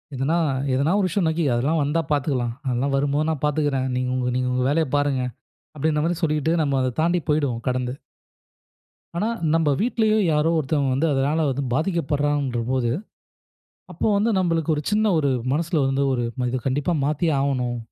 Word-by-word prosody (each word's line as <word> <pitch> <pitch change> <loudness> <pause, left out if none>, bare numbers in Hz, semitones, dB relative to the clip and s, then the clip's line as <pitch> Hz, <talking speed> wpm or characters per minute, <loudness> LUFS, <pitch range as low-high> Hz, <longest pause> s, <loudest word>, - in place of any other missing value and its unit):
எதனா 135 +5 0 0.4
எதனா 140 +5 +2
ஒரு 195 - +2
விஷயம், 185 +2 0
"அன்னக்கி 160 +1 0
அதெல்லாம் 140 +7 +1
வந்தா 150 +4 +1
பாத்துக்கலாம். 130 -5 0
அதெல்லாம் 130 +2 0
வரும்போது 145 +2 +1
நான் 155 -3 -3
பாத்துக்குறேன். 145 -3 0
நீங்க 125 0 -1
உங்க 125 -1 -1
நீங்க 125 0 0
உங்க 125 0 0
வேலைய 160 +1 +1
பாருங்க" 145 -2 +1 0.5
அப்டீன்ற 150 +1 0
மாரி 170 0 0
சொல்லிட்டு 155 0 +1
நம்ம 140 -2 0
அத 130 -1 -1
தாண்டி 175 +2 +2
போய்டுவோம்! 140 -6 +1
கடந்து. 125 -1 -1 1.2
ஆனா 210 - 0 0.3
நம்ப 165 -2 +2
வீட்லயோ! 220 -1 +2
யாரோ! 150 +1 +2
ஒருத்தவுங்க 140 -2 0
வந்து 145 +6 +1
அதனால 145 +4 +1
வந்து 135 +1 -2
பாதிக்கப் 165 +1 -1
பட்றாங்கன்றபோது, 130 -4 0 1.0
அப்போ 170 - -2
வந்து 215 +3 +2
நம்மளுக்கு 165 -3 +1
ஒரு 150 - -2
சின்ன 215 -1 +3
ஒரு 145 -3 +1 0.2
மனசுல 160 0 0
வந்து 135 +1 0
ஒரு 120 - -1
"நம்ம 125 +2 -2
இத 130 +1 -2
கண்டிப்பா 145 +6 0
மாத்தியே 155 +3 +1
ஆவணும்". 125 -3 -1
145 Hz, 165 wpm, -23 LUFS, 130-160 Hz, 1.2 s, சின்ன